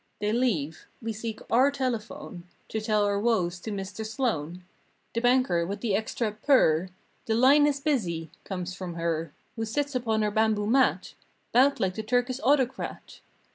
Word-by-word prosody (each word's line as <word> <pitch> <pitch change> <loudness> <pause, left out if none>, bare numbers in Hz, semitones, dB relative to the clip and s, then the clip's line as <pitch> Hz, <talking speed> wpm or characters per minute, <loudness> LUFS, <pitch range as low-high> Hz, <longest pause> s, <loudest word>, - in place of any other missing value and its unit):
They 210 +1 0
leave. 180 - -1
We 225 -1 -4
seek 220 +1 -6
our 255 +4 +5
telephone 235 -9 -4 0.2
To 220 - -2
tell 215 -1 +2
our 200 0 +1
woes 190 -6 +1
to 220 - -7
Mr. 200 +2 -5
Sloan 185 - -2 0.5
The 230 - -1
banker 245 -9 +3
with 200 +4 -4
the 225 -5 0
extra 220 +1 -1
P 210 - -19
E - - -29
R— 180 - +4 0.4
"The 220 - +1
line 280 +5 +6
is 285 -1 0
busy" 185 - -1
comes 185 -2 -5
from 180 -2 -6
her 165 -2 -2 0.2
Who 225 - -3
sits 285 +6 -2
upon 225 -4 0
her 210 - 0
bamboo 215 -1 +2
mat 260 +5 +2 0.4
'Bout 270 +4 +4
like 185 -1 0
the 220 - -4
Turkish 245 +3 0
autocrat. 265 -1 0
220 Hz, 175 wpm, -27 LUFS, 185-250 Hz, 0.5 s, line